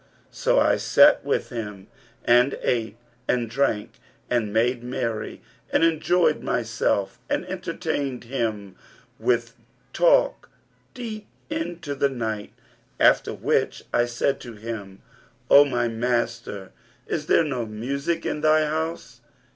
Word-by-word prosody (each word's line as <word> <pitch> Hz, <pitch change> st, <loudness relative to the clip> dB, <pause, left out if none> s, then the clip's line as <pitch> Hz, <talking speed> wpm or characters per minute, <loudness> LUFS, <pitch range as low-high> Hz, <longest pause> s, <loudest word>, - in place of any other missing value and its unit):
So -, -, +2 dB
I -, -, +3 dB
sat 295 Hz, +1 st, +5 dB
with 140 Hz, -, -1 dB
him 105 Hz, -5 st, -6 dB, 0.4 s
and 125 Hz, +3 st, +4 dB
ate 115 Hz, -3 st, -1 dB, 0.3 s
and 120 Hz, -2 st, +1 dB
drank 115 Hz, -3 st, -1 dB, 0.3 s
and 115 Hz, -4 st, +1 dB
made 120 Hz, +3 st, +1 dB
merry 115 Hz, -3 st, -4 dB, 0.3 s
and -, -, +3 dB
enjoyed 165 Hz, 0 st, +2 dB
myself 115 Hz, -4 st, -1 dB
and -, -, 0 dB
entertained 135 Hz, -3 st, -3 dB
him 110 Hz, -6 st, -3 dB, 0.4 s
with 120 Hz, -1 st, 0 dB, 0.4 s
talk -, -, +3 dB, 0.5 s
deep 220 Hz, -4 st, -6 dB, 0.2 s
in 300 Hz, -, -3 dB
to 145 Hz, -, -4 dB
the 140 Hz, 0 st, +1 dB
night;[FN#338] 110 Hz, -5 st, -4 dB, 0.5 s
after -, -, +4 dB
which -, -, 0 dB
I 120 Hz, -, +3 dB
said 120 Hz, +3 st, -1 dB
to 120 Hz, -2 st, -9 dB
him, 105 Hz, -3 st, -7 dB, 0.5 s
'O 145 Hz, +1 st, +9 dB
my 120 Hz, -3 st, 0 dB
master, 115 Hz, -4 st, -2 dB, 0.3 s
is 150 Hz, -2 st, -3 dB
there -, -, +5 dB
no 130 Hz, -7 st, -3 dB
music 140 Hz, +10 st, -3 dB
in 150 Hz, -, -2 dB
thy 155 Hz, 0 st, +4 dB
house.' 155 Hz, -5 st, -4 dB
125 Hz, 125 wpm, -24 LUFS, 115-150 Hz, 0.5 s, O